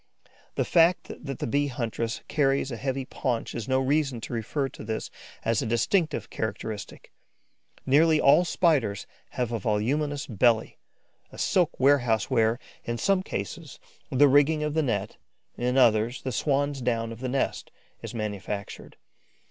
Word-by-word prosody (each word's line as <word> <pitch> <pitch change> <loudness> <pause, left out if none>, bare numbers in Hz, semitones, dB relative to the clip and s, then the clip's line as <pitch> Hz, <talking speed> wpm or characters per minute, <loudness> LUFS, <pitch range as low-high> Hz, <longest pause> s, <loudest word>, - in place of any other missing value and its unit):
The - - 0
fact 170 +1 +3
that 135 -3 -5
the - - -3
Bee 145 +5 +1
huntress 115 -3 -3
carries 140 -2 +1
a - - -3
heavy 130 +2 -3
paunch 130 -3 -3
is 115 0 -5
no 130 0 +2
reason 135 -2 +1
to 120 - -6
refer 120 +5 -2
to - - -11
this 110 +1 -4 0.3
as 115 -1 +2
a - - -2
distinctive 155 - 0
characteristic. 110 -1 -5 0.7
Nearly 155 +4 +4
all 140 +6 +6
Spiders 150 - +1 0.3
have 125 -2 -2
a 115 - -1
voluminous 140 +8 -1
belly, 115 0 +1 0.5
a - - -12
silk 175 -4 +1
warehouse 130 -5 +3
where, 115 -2 +3 0.3
in 120 0 -3
some 195 +7 +2
cases, - - -6 0.3
the 145 0 +5
rigging 145 +3 +4
of 150 -1 -1
the 160 - +2
net, 110 -7 -2 0.4
in 125 +2 -1
others, 115 -1 +3
the 130 - -2
swan's 140 +2 0
down 115 -2 -1
of 115 - -8
the 130 0 -3
nest 135 +1 -1 0.3
is 115 +1 -7
manufactured. 105 -2 -5
130 Hz, 155 wpm, -27 LUFS, 115-145 Hz, 0.7 s, all